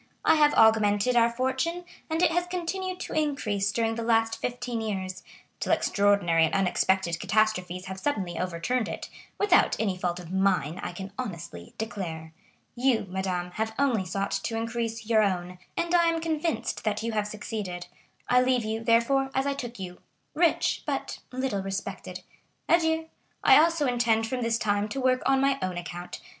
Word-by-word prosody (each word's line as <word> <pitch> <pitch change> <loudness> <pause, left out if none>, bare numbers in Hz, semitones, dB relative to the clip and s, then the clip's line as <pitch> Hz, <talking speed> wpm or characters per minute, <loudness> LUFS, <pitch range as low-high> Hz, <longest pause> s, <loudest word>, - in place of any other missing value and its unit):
I - - +6
have 300 -2 +4
augmented 220 +1 +4
our 235 -1 +5
fortune, 260 +9 -1 0.2
and 320 +2 0
it 340 - +5
has 350 +1 0
continued 365 +1 -3
to - - -5
increase 270 -10 0
during 225 +1 0
the 230 - -4
last 225 -1 +2
fifteen 245 -1 -3
years, 190 -4 -4 0.4
till - - -1
extraordinary 200 -5 +3
and 160 - -2
unexpected 190 -2 +1
catastrophes 185 -4 0
have 190 0 -6
suddenly 190 - -2
overturned 185 +7 -1
it,—without 405 -3 0
any 200 -4 0
fault 180 -1 -2
of 175 -1 -10
mine, 185 -5 +1
I - - -4
can 190 +2 -8
honestly 170 - -6
declare. 165 -8 -5 0.4
You, 245 -3 +1
madame, 180 -1 -2
have 220 +3 -3
only 255 -8 +2
sought 195 +2 -2
to 225 - -2
increase 230 0 -3
your 220 -1 +4
own, 180 -3 -1 0.2
and 340 +1 -1
I 345 -1 +5
am 330 0 +1
convinced 315 -7 -2
that 215 0 -1
you 230 - -1
have 210 -1 -1
succeeded. 210 -4 -5 0.4
I 250 0 +5
leave 255 -2 +2
you, 220 +1 -3
therefore, 235 +4 +3
as 265 +1 +1
I 280 - +1
took 245 -3 -6
you,—rich, 195 - -1
but - - -3
little 255 -6 -1
respected. 195 0 -5 0.5
Adieu! 320 -1 +2 0.4
I - - +8
also 330 -1 +3
intend 235 -3 +2
from 250 +2 -3
this 230 -1 +1
time 205 -1 0
to 270 - -4
work 255 -1 +2
on 270 0 +4
my 275 0 +2
own 185 -1 -2
account. 175 0 -6
225 Hz, 170 wpm, -27 LUFS, 190-265 Hz, 0.5 s, I